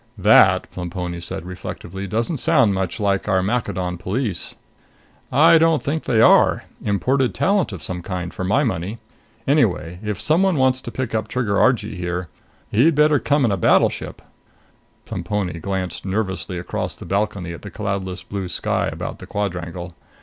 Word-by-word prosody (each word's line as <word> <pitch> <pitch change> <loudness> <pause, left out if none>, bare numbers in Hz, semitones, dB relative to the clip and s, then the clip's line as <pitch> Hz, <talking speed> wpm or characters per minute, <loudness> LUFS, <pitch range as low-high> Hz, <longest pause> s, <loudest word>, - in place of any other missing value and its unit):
"That," 95 -2 +5
Plemponi 90 -1 -5
said 95 +1 -5
reflectively, 90 +1 -7
"doesn't 115 - -1
sound 135 -11 +3
much 95 -2 -2
like 100 -2 0
our 95 -2 +2
Maccadon 95 -5 -2
police." 100 +1 -2 0.8
"I 165 +3 +6
don't 165 -1 +3
think 155 +3 -2
they 115 -4 +2
are. 115 - +5 0.2
Imported 125 +6 +1
talent 185 - +2
of 95 -5 -8
some 90 -1 -4
kind, 90 -1 -5
for - - -5
my 110 +10 +2
money. 100 - -2 0.5
Anyway, 90 - +1
if 105 -3 -3
someone 180 +4 +2
wants 130 -1 +2
to - - -7
pick 130 -2 -4
up 110 -1 -1
Trigger 110 -3 0
Argee 110 -5 +2
here, 90 -1 -3 0.4
he'd 140 +9 +4
better 150 -1 +4
come 145 0 +2
in 115 - +2
with 100 - -1
a - - -11
battleship." - - +2 0.8
Plemponi 95 -6 -3
glanced 95 -1 -3
nervously 95 -2 -2
across 90 - -4
the - - -10
balcony 100 -3 -1
at 85 - -9
the - - -8
cloudless 100 -3 -4
blue 100 -2 -5
sky - - -1
about - - -5
the - - -10
quadrangle. 90 -4 -4
100 Hz, 165 wpm, -21 LUFS, 90-125 Hz, 0.8 s, I